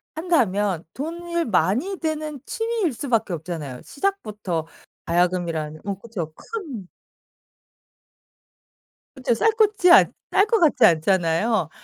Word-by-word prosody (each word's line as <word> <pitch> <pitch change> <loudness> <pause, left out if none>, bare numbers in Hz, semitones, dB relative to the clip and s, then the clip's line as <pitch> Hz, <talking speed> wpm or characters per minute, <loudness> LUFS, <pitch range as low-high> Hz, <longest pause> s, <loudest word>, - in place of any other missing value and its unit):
한다면 210 - +1
돈을 340 +3 -3
많이 225 - +1
드는 310 -3 -3
취미일 450 - -1
수밖에 230 - -1
없잖아요. 155 -6 -6
시작부터 215 - -3 0.4
가야금이라는 170 -3 0
어 200 -1 -3
그쵸. 190 -9 -6
큰 295 - -7 2.3
그쵸. 255 -2 0
쌀 235 - +3
것지 420 -4 +3
않 - - +7 0.2
쌀 395 - +4
것 455 0 +2
같지 300 -7 +3
않잖아요. 170 +2 +2
230 Hz, 240 characters per minute, -23 LUFS, -, 2.3 s, 않